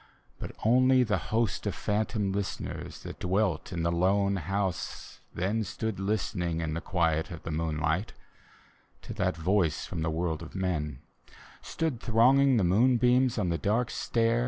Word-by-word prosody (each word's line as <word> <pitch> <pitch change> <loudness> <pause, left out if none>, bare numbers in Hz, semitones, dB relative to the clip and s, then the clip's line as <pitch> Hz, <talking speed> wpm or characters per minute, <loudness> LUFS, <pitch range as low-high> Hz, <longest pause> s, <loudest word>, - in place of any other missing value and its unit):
But - - -6
only 130 +2 +5
the 110 -3 0
host 110 -2 0
of - - -2
phantom 105 -1 -1
listeners 100 -1 -5
That - - -8
dwelt 95 0 0
in 85 -2 -2
the 85 - +1
lone 100 +3 +2
house 95 +1 -3
then 100 +6 -1
Stood 110 0 -4
listening 90 -4 -1
in 80 -2 -2
the 85 - -3
quiet 80 -3 0
of 85 -3 -8
the 80 - -5
moonlight 80 +4 -1 0.9
To - - -7
that - - -1
voice 90 0 +1
from 85 - -5
the 80 - 0
world 80 0 -2
of 85 - -10
men: 80 -8 -2 0.6
Stood 160 -8 -2
thronging 130 +4 +4
the 105 - +2
moonbeams 125 +5 +3
on 95 -5 0
the 85 - -1
dark 115 +4 0
stair. 115 0 +1
95 Hz, 155 wpm, -29 LUFS, 85-115 Hz, 0.9 s, only